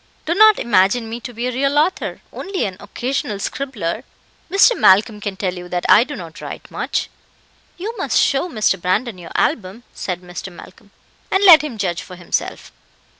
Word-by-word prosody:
Do 330 - 0
not 430 +3 +6
imagine 220 +2 +2
me 230 +1 -5
to 245 - -8
be 235 +1 -4
a 250 - -1
real 275 +3 0
author 320 +5 0
only 390 -1 -3
an 190 -2 -4
occasional 220 +1 -3
scribbler. 220 -3 -4 0.5
Mr. 400 +6 +5
Malcolm 210 +2 +4
can 200 -2 -4
tell 185 -2 -2
you 180 -1 -9
that 175 0 -3
I 220 - +7
do 290 +3 -7
not 165 -4 -10
write - - -8
much." - - -2 0.7
"You 425 +6 -5
must - - 0
show 275 +6 +1
Mr. 215 - 0
Brandon 195 +3 -1
your 170 - -10
album," 225 - -1
said 180 -2 -4
Mr. 180 +1 -8
Malcolm, 200 +4 -15 0.4
"and 385 +1 +1
let 345 -6 +9
him 295 -7 -6
judge 180 -4 -2
for 180 - -11
himself." 175 -1 -4
220 Hz, 180 wpm, -19 LUFS, 185-275 Hz, 0.7 s, let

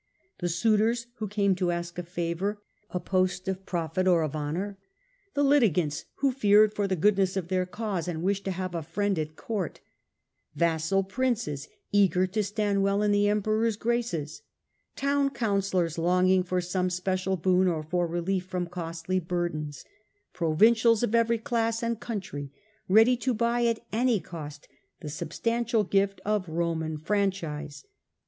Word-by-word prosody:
The 175 -2 -1
suitors 220 +6 +2
who 215 - -3
came 200 -1 +2
to 180 -2 0
ask 170 0 -3
a - - -1
favour, 175 +4 -3 0.3
a 180 - -2
post 185 +1 0
of 190 0 -3
profit 175 +1 -1
or 175 -3 +4
of 155 -1 -3
honour; 175 +7 -3 0.6
the 285 - +2
litigants 180 - +2
who 275 -1 +1
feared 210 -4 +5
for 205 -1 0
the 190 - 0
goodness 195 +1 +2
of 180 -2 -3
their 185 -1 0
cause 195 -4 -3
and 165 -2 -3
wished 200 +1 0
to - - -1
have 185 0 -4
a 170 - -2
friend 200 +3 -1
at 155 0 -4
court; 205 -4 -4 0.8
vassal 170 +3 +1
princes 220 - -2 0.2
eager 190 -2 +4
to 190 +4 -1
stand 205 0 0
well 200 +1 +2
in 210 - +2
the 205 0 +3
Emperor^s 215 +1 +1
graces; 220 -11 -2 0.5
town 280 0 +1
councillors 195 - 0
longing 180 +2 +3
for 180 0 -1
some 180 +1 -1
special 185 +1 -1
boon 185 +2 +3
or 160 -3 0
^ - - -18
for 175 +1 0
relief 175 +2 -1
from 180 -1 -2
costly 170 +1 -3
burdens; 165 -5 -3 0.5
provincials 220 +7 +4
of 240 - +1
rousoppoT - - +2
every 230 0 +2
class 230 0 -1
and 230 -1 -1
country 180 - -5 0.4
ready 225 +6 +6
to 250 0 -1
buy 235 +1 +1
at 230 0 -1
any 235 0 +2
tunities 150 -4 -8 0.5
substantial 230 - -1
gift 195 0 +1
of 205 -4 0
Roman 160 -1 -1
franchise. 155 -5 -2
190 Hz, 160 wpm, -27 LUFS, 170-215 Hz, 0.8 s, ready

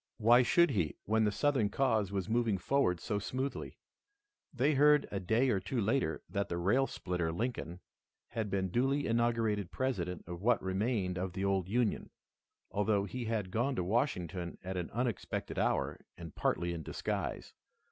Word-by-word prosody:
Why 120 +2 +6
should 170 +6 +4
he, 90 - 0
when 110 +1 +2
the 105 - +2
Southern 130 -3 +1
cause 110 -5 +1
was 95 -2 -2
moving 115 -2 +1
forward 90 -3 +1
so 105 +2 -2
smoothly? 130 +6 -4 0.7
They 140 +1 +2
heard 150 +1 +5
a 100 - -2
day 110 +8 +2
or 95 - +2
two 125 +6 -3
later 115 +6 0
that 100 -1 -2
the 85 - -2
rail 115 +10 +2
splitter, 90 -3 -2
Lincoln, 90 -3 -3 0.5
had 110 -3 -3
been 95 -1 0
duly 135 +6 +1
inaugurated 115 -4 +1
President 90 -10 -2
of 85 0 -7
what 120 +3 +3
remained 95 -1 -1
of 90 -1 -3
the 95 +2 -2
old 95 -2 0
Union, 115 0 0 0.6
although 100 0 +1
he 120 +4 -5
had 110 -4 -2
gone 120 +6 0
to 90 - 0
Washington 90 - -1
at 95 +1 -4
an 90 -2 -3
unexpected 120 -3 -2
hour, - - 0 0.2
and 85 -3 -9
partly 85 0 0
in 85 - -5
disguise. - - -4
105 Hz, 170 wpm, -33 LUFS, 95-125 Hz, 0.7 s, Why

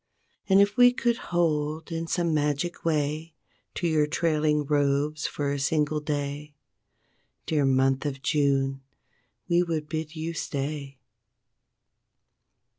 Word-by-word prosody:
And 195 0 +6
if 200 +1 +3
we 245 0 +8
could 240 -1 0
hold 155 -2 0
in 165 0 -3
some 170 -1 0
magic 150 +3 -1
way 155 0 -1 0.4
To 175 - -1
your 155 -2 +2
trailing 150 -2 +1
robes 145 +1 +1
for 145 -1 -2
a 140 - -2
single 150 +2 +1
day, 145 0 -4 0.9
Dear 150 -3 +1
month 135 +1 +2
of 135 -1 -5
June, 135 -2 +1 0.7
we 175 0 +3
would 160 -3 -2
bid 155 0 -4
you 160 +1 -4
stay. 140 -2 -4
150 Hz, 120 wpm, -26 LUFS, 145-165 Hz, 0.9 s, we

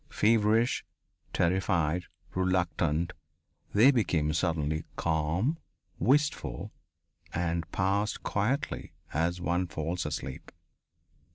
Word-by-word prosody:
Feverish, 110 +2 +3 0.5
terrified, 90 -1 +1 0.3
reluctant, 90 -2 +1 0.6
they 115 +7 +7
became 85 - +1
suddenly 80 -2 0
calm, 85 - 0 0.4
wistful, 145 +2 +1 0.6
and 85 0 -1
passed 100 +3 0
quietly 120 +8 -1 0.2
as 85 +3 +1
one 90 +1 0
falls 80 +1 -2
asleep. 75 -3 -5
90 Hz, 80 wpm, -30 LUFS, 80-105 Hz, 0.6 s, they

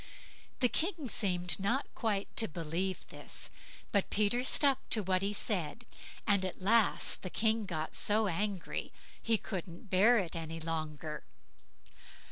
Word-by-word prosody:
The 250 - +6
King 325 +1 -2
seemed 180 -5 0
not 235 +8 +1
quite 205 -4 -2
to 225 - +6
believe 170 +4 -3
this, - - -5 0.4
but 200 -2 +1
Peter 215 +4 +2
stuck 275 0 +2
to 215 - +3
what 185 0 +1
he 200 +1 +1
said, 200 0 -1 0.4
and 200 -3 +3
at 185 - -4
last 215 +3 +3
the 185 - -5
King 220 +1 +1
got 160 -4 -3
so 215 +1 +3
angry, 195 0 -2 0.3
he 225 -1 +3
couldn't 185 -1 -7
bear 210 +6 +6
it 180 -5 -1
any 165 0 -4
longer. 155 -2 -4
195 Hz, 140 wpm, -33 LUFS, 170-220 Hz, 0.4 s, The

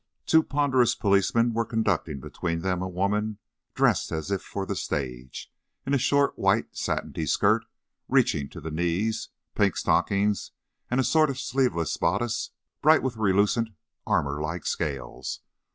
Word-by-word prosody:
Two 160 - +5
ponderous 140 -5 +2
policemen 105 +4 +2
were 115 +1 +1
conducting 100 - -1
between 85 +5 -3
them 90 -1 -1
a 95 - -3
woman 105 +3 -1 0.4
dressed - - +2
as 80 +4 -3
if 95 -1 0
for 100 -1 -5
the - - -3
stage, 65 -2 -4 0.3
in 135 - -1
a 140 - +3
short, 140 +3 +2
white, - - +1
satiny 80 - -2
skirt - - +3 0.4
reaching 70 -1 +2
to - - -9
the 80 - -6
knees, 90 +7 -1 0.2
pink - - +2
stockings, 100 +1 +1 0.4
and 125 - +1
a - - +4
sort 155 +4 +3
of 135 - -3
sleeveless 125 -13 0
bodice 100 +7 0 0.3
bright 155 +2 +5
with 130 -3 -1
relucent, 105 +2 +2 0.4
armour 70 +1 0
like 80 +2 -4
scales. 70 -3 -3
100 Hz, 150 wpm, -26 LUFS, 85-120 Hz, 0.4 s, Two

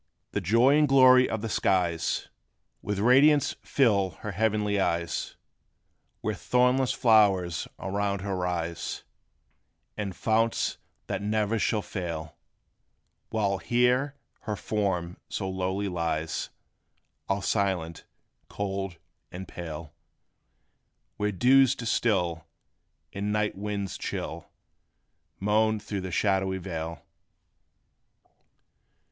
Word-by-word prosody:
The 100 - -1
joy 120 - +4
and 150 - +4
glory 130 -2 +6
of 110 -1 -3
the - - -1
skies 90 -5 0 0.5
With 105 -1 -3
radiance 135 +7 +5
fill 100 - +2
her 105 - -4
heavenly 105 0 +1
eyes, 85 -3 -1 0.9
Where - - -1
thornless 125 +1 +2
flowers 105 -9 +3
around 100 0 -2
her 100 -1 -2
rise, 85 -2 -3 0.9
And 100 -3 -4
founts 115 +1 +1 0.3
that - - -3
ne'er 105 +1 0
shall 105 0 0
fail; 80 -4 -5 0.9
While 100 -3 0
here 125 - +2 0.2
her 105 -2 -4
form 95 -5 -2
so 95 - -3
lowly 95 +2 -2
lies 80 -3 -2 0.8
All 95 0 0
silent, 90 -5 -1 0.5
cold 95 -3 -3 0.3
and 95 +2 -7
pale; 80 -3 -7 1.2
Where 105 0 0
dews 130 +7 +5
distil, 95 -8 0 0.7
and 100 +1 -2
night 105 0 0
winds 100 -1 -4
chill - - -5 0.9
Moan 110 +2 +2
through 100 -1 -4
the 95 0 -5
shadowy 95 0 +1
vale. 85 -4 -5
100 Hz, 100 wpm, -27 LUFS, 90-110 Hz, 1.2 s, glory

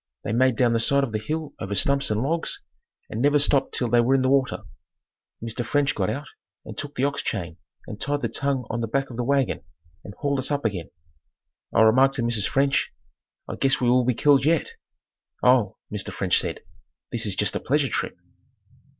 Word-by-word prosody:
They - - -2
made 130 +1 +3
down 120 0 +2
the 115 - +2
side 140 +4 +2
of 130 - -2
the 110 - -1
hill 155 +5 -4
over 100 +1 -4
stumps 140 +5 +2
and 110 +2 0
logs 165 +4 -2 0.4
and 110 - -4
never 145 +2 +4
stopped 140 -1 +2
till 125 - +1
they 120 0 +4
were 130 +3 +3
in 130 - +2
the 130 - +2
water. 135 -2 +1 0.8
Mr. 115 +1 -4
French 140 +4 +1
got 95 -3 -1
out 145 +2 -4 0.4
and - - -8
took 145 0 -6
the 130 - -1
ox 140 0 0
chain 85 - -4 0.3
and 105 - -9
tied 145 0 -1
the - - +2
tongue 135 -3 -2
on 115 +1 -2
the 115 - -2
back 135 +3 -1
of 115 - -8
the 125 - -1
wagon 135 0 +1 0.4
and 100 - -10
hauled 140 -1 -1
us 130 - 0
up 145 -3 -2
again. 95 -6 -2 0.8
I - - +3
remarked 130 +5 +5
to 125 - -1
Mrs. 115 -3 +1
French, 135 +3 +1 0.6
"I - - -6
guess 135 0 +2
we 125 - +2
will 125 0 +4
be 125 -1 +1
killed 140 +2 +4
yet!" 165 - +1 0.7
"Oh," - - +3 0.2
Mr. - - -3
French - - +1
said, - - -3 0.5
"This - - 0
is - - +1
just - - 0
a - - 0
pleasure - - +1
trip." - - -3
130 Hz, 210 wpm, -24 LUFS, 115-140 Hz, 0.8 s, remarked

